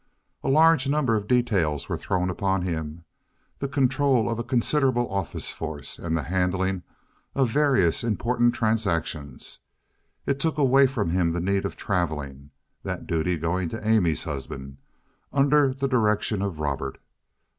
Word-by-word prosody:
A - - -1
large 155 -1 +5
number 140 -6 +2
of 105 -1 -2
details 100 - +1
were - - -2
thrown 90 0 -1
upon 95 -1 0
him—the 80 - -7
control 135 -3 +2
of 115 - -2
a - - -1
considerable 125 0 +1
office 95 -4 -3
force, - - -5
and 80 -1 -1
the 80 - -2
handling 95 +1 0 0.5
of 130 -4 +2
various 130 - +2
important 120 +2 +1
transactions. 85 - -2 0.7
It 140 0 0
took 160 +2 0
away 135 -1 +5
from 110 -10 -2
him 90 -1 +2
the 85 - -1
need 95 +2 0
of - - -4
traveling, 75 -7 -3 0.3
that - - -5
duty 85 +2 0
going 85 +2 -1
to 110 +2 -6
Amy's 90 -9 +3
husband, 70 -1 -6 0.5
under 140 0 +4
the 135 +1 -2
direction 105 -4 +1
of 100 -5 -3
Robert. 70 -2 -3
100 Hz, 145 wpm, -25 LUFS, 85-130 Hz, 0.7 s, large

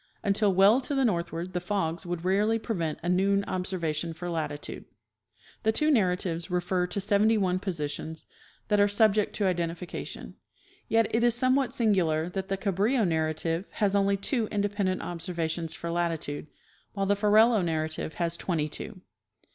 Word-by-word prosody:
Until 200 0 +2
well 200 +7 +5
to 280 +2 -3
the 270 -1 +2
northward 170 -3 -2
the 180 - 0
fogs 175 -2 -2
would 175 0 -4
rarely 205 +4 +2
prevent 175 -9 -2
a - - -3
noon 195 +2 +2
observation 170 -3 -2
for 175 +1 -5
latitude. 150 -3 -4 0.8
The 220 - +2
two 305 +7 +2
narratives 180 - 0
refer 180 0 0
to 200 - -2
seventy 205 +3 +3
one 185 -2 +1
positions 160 -3 -4 0.4
that 210 -1 +3
are 205 - +5
sub 205 +1 +4
ject 210 -1 0
to 205 - 0
identification; 175 -1 -4 0.5
yet 225 0 +3
it 230 +1 +2
is 240 -1 +4
somewhat 255 +2 +2
singular 175 -8 +2
that 190 +1 -4
the 195 0 -1
Cabrillo 205 +5 +1
narrative 160 +2 -1
has 205 -1 +1
only 200 0 +3
two 225 +3 -1
independent 205 -2 -1
observations 170 -2 -3
for 170 - -5
latitude, 165 -4 -2 0.5
while 195 -1 -1
the 200 +1 +2
Ferrelo 215 +1 +4
narrative 160 -1 -2
has 170 -1 -1
twentj^ 155 -5 -1
two. 195 +2 -7
185 Hz, 160 wpm, -28 LUFS, 170-210 Hz, 0.8 s, well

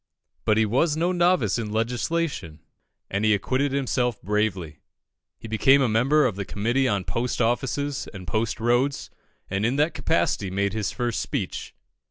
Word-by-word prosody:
But 110 - +3
he 110 - +4
was 145 +8 +1
no 175 +3 +1
novice 175 - +2
in 110 -2 -4
legislation, 120 - -2 0.5
and 100 +2 -1
he 110 -1 +4
acquitted 130 +7 0
himself 125 -4 0
bravely. 95 -6 -1 0.6
He - - -10
became 130 +5 +4
a 135 - +3
member 130 +7 +3
of 115 -6 0
the 100 - -2
Committee 120 +8 0
on 100 -5 0
Post 115 +9 -2
Offices 135 +4 -1
and 95 -3 -9
Post 110 +6 -1
Roads, 120 +4 0 0.4
and 95 +1 -2
in 120 +4 +1
that 150 +4 +2
capacity 105 - 0
made 100 +1 -1
his 110 -2 -2
first 120 -3 -2
speech. - - -4
115 Hz, 165 wpm, -25 LUFS, 105-135 Hz, 0.6 s, he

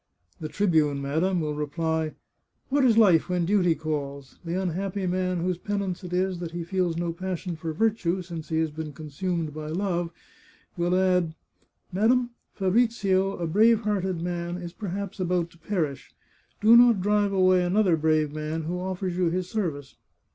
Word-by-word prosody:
" 90 0 -40
The 155 - -4
tribune, 155 -5 +2
madam, 165 +6 0
will 150 -1 -2
reply, 160 +1 -2 0.3
' - - -47
What 280 +1 +2
is 235 -4 +4
life 185 -7 +5
when 180 -1 +1
duty 180 -3 +3
calls? 140 -3 -5
' - - -36
The 170 +3 -1
unhappy 190 +2 -2
man 185 -1 0
whose 180 0 -1
penance 200 -2 -3
it 180 - -7
is 185 0 0
that 170 -2 -6
he 170 -1 -3
feels 175 -1 -1
no 170 -1 -1
passion 180 0 -4
for 160 0 -4
virtue 190 -1 0
since 165 -3 -7
he 160 - 0
has 160 -1 -1
been 155 0 -6
consumed 155 +2 -3
by 155 0 -6
love, 175 0 -1 0.7
will 175 0 +1
add: 180 -4 +2 0.3
* - - -43
Madam, 240 +5 +2 0.2
Fabrizio, 195 -2 +2
a 170 - -2
brave 220 +7 +4
hearted 190 -5 -1
man, 175 0 -3
is 175 -1 -7
perhaps 200 0 -5
about 175 -2 0
to 170 - -21
perish. 160 -7 -3 0.5
Do 220 +3 +7
not 240 -3 +7
drive 205 0 +2
away 185 -1 +4
another 185 0 +3
brave 155 -1 +1
man 155 +1 -3
who 175 +3 -3
offers 185 -1 -3
you 180 -2 +2
his 180 +1 -3
service. 155 -10 -3
180 Hz, 180 wpm, -26 LUFS, 160-190 Hz, 0.7 s, Do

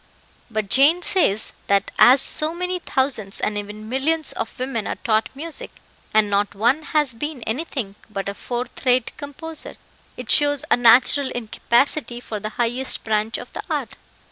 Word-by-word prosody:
"But 215 -2 -2
Jane 295 - +5
says, 220 - +1
that 200 0 +2
as 260 +2 +7
so 310 +4 +1
many 360 +1 -2
thousands 260 - 0
and 210 - -1
even 210 +1 -6
millions 300 +6 0
of 225 - -5
women 255 -4 -3
are - - -2
taught 220 -1 0
music, 320 +3 -4 0.4
and 215 -1 +3
not 205 0 0
one 240 +9 +2
has 300 -4 0
been 285 +1 -5
anything 245 -4 -4 0.2
but 195 -2 -5
a 200 - -2
fourth 240 +4 -5
rate 250 -2 +2
composer, 305 +2 -7 0.4
it 250 -3 -4
shows 290 -1 +3
a - - +7
natural 250 +3 +5
incapacity 240 +3 0
for 220 -3 -6
the 215 +1 -4
highest 245 +2 0
branch 215 0 -1
of - - -10
the - - -5
art. - - -3
245 Hz, 165 wpm, -22 LUFS, 215-290 Hz, 0.4 s, as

